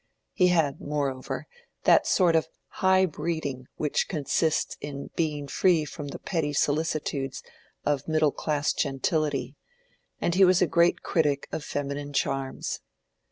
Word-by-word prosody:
He 180 - +4
had, 160 -6 +2
moreover, 140 -3 -3 0.4
that - - +5
sort 175 -4 +4
of 160 -1 +2 0.3
high 190 0 +5
breeding 150 -6 -3
which 150 -2 0
consists 155 0 0
in 140 -1 -6
being 150 -3 -1
free 165 +1 +3
from 145 -1 -7
the - - -6
petty 160 -5 -2
solicitudes 145 -2 -1 0.4
of 145 -2 0
middle 155 -2 +3
class 150 0 0
gentility, 140 -1 -1 0.6
and 170 - 0
he 190 +2 +5
was 185 0 +6
a 180 - +4
great 170 +2 +3
critic 145 -4 +1
of 155 - -4
feminine 145 0 -4
charms. 135 0 -2
150 Hz, 135 wpm, -27 LUFS, 140-165 Hz, 0.6 s, was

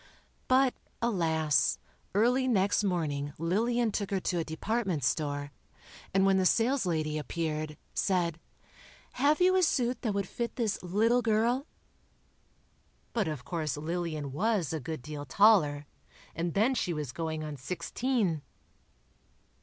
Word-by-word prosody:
But, 260 0 +4 0.3
alas, 160 - +2 0.4
early 250 +5 +3
next 200 -3 +2
morning 145 -7 -1
Lillian 225 +8 +1
took 200 -1 -2
her 195 - 0
to 175 -1 -1
a - - 0
department 185 - -2
store, 145 +1 -1 0.6
and 195 0 +3
when 195 0 +4
the 190 - +2
saleslady 175 - +1
appeared, 155 -1 -3 0.2
said: 175 -4 0 0.7
"Have 285 +4 +2
you 370 +1 +5
a 375 - +4
suit 255 -7 +1
that 220 -5 -1
would 200 -2 -1
fit 235 +4 -4
this 225 -5 -1
little 220 +7 +2
girl?" 235 +5 +1 1.5
But 220 -6 0
of 150 -6 -5
course 155 -2 -2
Lillian 155 -2 -3
was 185 -1 0
a 160 - -1
good 155 -2 -6
deal 150 +1 -6
taller, 150 -3 +4 0.5
and 170 0 -3
then 225 +7 +3
she 190 -8 -1
was 150 -5 -4
"going 160 +1 -3
on 150 -1 -5
sixteen." 180 - -1
180 Hz, 135 wpm, -30 LUFS, 155-230 Hz, 1.5 s, you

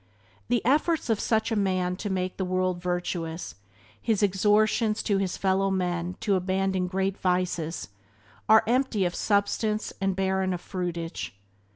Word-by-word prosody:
The 240 -1 +1
efforts 300 0 +2
of 215 - +1
such 220 0 +1
a - - +1
man 185 -3 +1
to 205 - -4
make 185 -1 -2
the 190 - -1
world 185 -1 0
virtuous, 175 -2 -3 0.5
his 220 -3 +1
exhortations 210 +2 +2
to 200 -3 +1
his 190 -2 -1
fellow 195 0 +2
men 180 -1 -1
to 205 - +1
abandon 190 0 0
great 190 +1 -1
vices, 180 -5 -1 0.6
are 220 0 +7
empty 240 -4 +1
of 175 - -1
substance 210 +2 0
and 195 -1 +1
barren 190 0 0
of 175 - -7
fruitage. 170 - -4
190 Hz, 150 wpm, -27 LUFS, 180-210 Hz, 0.6 s, are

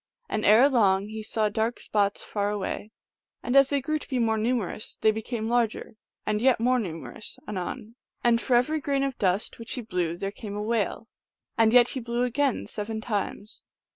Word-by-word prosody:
And 215 - -2
erelong 210 -4 +5
he 220 0 -5
saw 215 0 0
dark 220 +3 -1
spots 200 -1 0
far 205 -1 -1
away, 210 +1 -4 0.5
and 245 - -1
as 275 -1 +7
they 285 - +1
grew 310 +3 -1
to - - -12
be 260 - -1
more 225 -2 +2
numerous 225 -2 -2
they 220 - +5
became 220 +1 -4
larger, 235 -2 0 0.3
and 215 0 0
yet 260 -1 +4
more 250 +2 +3
numerous 180 +1 -6
anon, 210 +3 -5 0.3
and 235 -1 +4
for 255 - +2
every 305 +6 +2
grain 275 -1 0
of 275 -2 -3
dust 190 +3 0
which 230 - -6
he 250 - -3
blew 180 -6 -2
there 195 +2 -3
came 205 -1 -7
a 210 - -3
whale; 225 0 -1 0.5
and 225 -2 +4
yet 245 0 +6
he 265 - -3
blew 240 0 -1
again 260 +2 0
seven 220 +1 -4
times. 210 -1 -4
225 Hz, 190 wpm, -26 LUFS, 210-245 Hz, 0.5 s, as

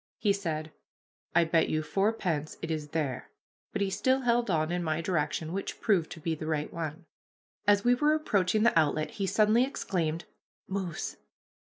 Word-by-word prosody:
He 205 -2 +2
said, 160 -5 -3 0.6
"I 175 - +6
bet 160 0 +2
you 155 0 0
fourpence 180 -5 -1
it 165 - -2
is 155 -2 -2
there," 145 -4 -3 0.4
but 200 - 0
he 195 - -1
still 260 +6 +2
held 240 -2 +2
on 160 -2 +1
in 175 0 -1
my 155 -1 0
direction, 165 -1 -1
which 195 - -4
proved 190 -7 +2
to 160 - -11
be 165 +1 -1
the 155 0 -5
right 155 -1 -1
one. 165 +1 -5 0.6
As 205 0 +5
we 245 - +5
were 295 +5 +3
approaching 215 - +1
the 235 - +4
outlet 155 0 +1
he 195 -2 -2
suddenly 215 +5 +4
exclaimed, 175 - -2 0.4
"Moose! 190 -4 -3
175 Hz, 175 wpm, -29 LUFS, 155-205 Hz, 0.6 s, I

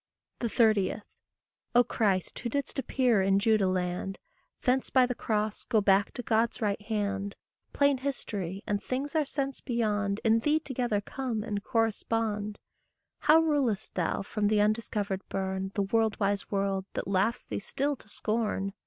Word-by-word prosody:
30. 215 -4 +2 0.7
O 245 - +7
Christ, 195 -7 0
who 235 - -3
didst 280 +2 -2
appear 250 -6 +2
in 195 +1 +3
Judah 215 -1 +3
land, 185 +1 -2 0.5
Thence 255 0 +2
by 260 -1 +5
the 250 - -2
cross 215 -2 -1
go 225 -4 +2
back 200 0 +3
to 245 - -5
God's 230 +1 +1
right 205 -3 0
hand, 200 -2 -2 0.4
Plain 280 -2 +3
history, 200 -9 -4
and 205 -1 -1
things 270 +3 -3
our 310 -2 +2
sense 275 -1 -3
beyond, 210 -5 0
In 225 0 +4
thee 300 +6 +2
together 245 -8 -1
come 240 -1 -3
and 205 -3 -3
correspond: 220 -2 0 0.6
How 320 +1 +6
rulest 285 -10 0
thou 180 +2 -1
from 205 +1 -1
the 210 0 +3
undiscovered 210 -2 0
bourne 190 0 -2
The 200 - +2
world 220 +1 +1
wise 200 -1 0
world 195 -1 0
that - - -3
laughs 200 +5 +1
thee - - -3
still 280 +7 -1
to 210 - -16
scorn? 210 -3 -1
215 Hz, 155 wpm, -29 LUFS, 200-245 Hz, 0.7 s, O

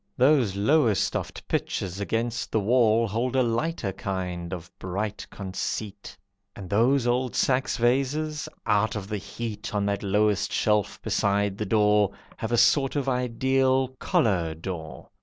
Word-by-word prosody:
Those 130 -6 +4
Lowestoft 115 0 +1
pitchers 95 0 -2
against 115 +4 -2
the 110 - +2
wall 115 +1 +3
Hold 120 +5 -1
a 130 - +4
lighter 115 - -1
kind 90 -3 -4
of 90 -1 -7
bright 100 +3 -4
conceit; 100 +1 -5 0.4
And 95 - -8
those 120 +5 +3
old 125 +1 0
Saxe 130 0 +1
vases, 140 +5 0 0.2
out 105 +2 +2
of 100 -2 -5
the 105 -1 -3
heat 110 +3 -6
On 100 -1 +1
that 100 0 -1
lowest 100 0 +1
shelf 105 -1 +1
beside 100 -1 +1
the 105 - -2
door, 105 -1 +3 0.2
Have 110 - -4
a 120 - +2
sort 135 +3 +4
of 140 -2 -1
Ideal, 130 +1 +1
"couleur 85 -7 +1
d'or". 80 -1 -7
110 Hz, 140 wpm, -26 LUFS, 100-125 Hz, 0.4 s, Those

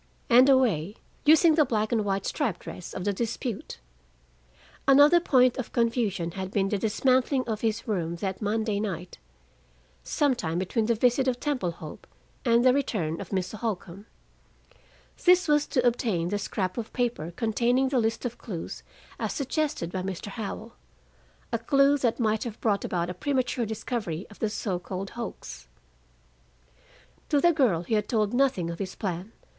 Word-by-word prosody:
And 250 +3 +7
a 270 - +7
way 205 -7 0 0.3
using 315 +2 +6
the 305 0 +5
black 220 -5 -1
and 225 -3 +2
white 195 -1 -1
striped 255 - -1
dress 180 - -8
of 185 - -4
the 205 +1 0
dispute. 230 +1 -4 1.1
Another 290 +5 +7
point 255 -6 +3
of 255 - -4
confusion 230 -7 0
had 190 +1 -5
been 195 0 0
the 205 - 0
dismantling 255 +5 +2
of 220 -2 -3
his 225 0 -1
room 170 -6 -1
that 190 +3 -4
Monday 215 0 0
night, 185 -4 -5 0.8
some 290 - +1
time 170 -9 -3
between 200 +5 0
the 235 - +2
visit 250 +4 +2
of 250 -1 0
Temple 275 - -1
Hope 155 -2 -10 0.4
and 235 0 +3
the 255 - +6
return 195 - -1
of 195 - -8
Mr. 195 +2 -3
Holcombe. 200 -2 -4 1.2
This 360 0 +5
was 295 -1 +3
to 250 -3 0
obtain 220 -8 +1
the 205 +1 -1
scrap 190 +1 -2
of 225 - -6
paper 240 -10 -1
containing 240 +3 +1
the 260 -2 +2
list 225 +2 -1
of 240 -1 -4
clues 180 -8 -6 0.4
as - - -2
suggested 280 - -2
by 185 - -3
Mr. 190 +1 -5
Howell, 220 +2 -6 0.8
a 230 - +1
clue 275 +4 +3
that 240 -2 0
might 220 -1 +1
have 235 -3 -6
brought 205 -3 +1
about 175 0 -1
a - - -5
premature 250 +2 -1
discovery 210 -5 -4
of 205 - -15
the 220 - 0
so 195 -4 -2
called 190 +2 -6
hoax. 200 - -7 1.6
To 290 - +3
the 345 +4 +4
girl 230 - +2
he 180 - -3
had 210 -2 +1
told 215 -2 +1
nothing 245 -10 +1
of 170 - -8
his 190 -1 -4
plan. 190 +2 -4
220 Hz, 170 wpm, -27 LUFS, 190-255 Hz, 1.6 s, And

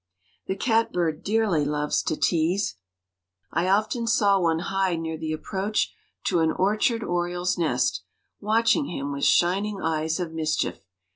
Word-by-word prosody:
The 190 - -1
catbird 180 -8 0
dearly 205 -7 +1
loves 150 0 0
to - - 0
tease. 170 - +1 0.7
I 170 +2 0
often 215 +4 +1
saw 205 -3 +3
one 165 -2 +2
hide 190 0 -1
near 160 0 -3
the 160 0 -4
approach 195 +6 -2 0.3
to 175 - +1
an 160 -1 +3
orchard 215 +5 +1
oriole's 175 0 -1
nest, 130 - 0 0.4
watching 225 +7 +2
him 140 -4 -4
with 140 0 -1
shining 195 +4 +2
eyes 160 0 -1
of 175 -3 -3
mischief. 155 -1 -1
175 Hz, 140 wpm, -25 LUFS, 160-205 Hz, 0.7 s, saw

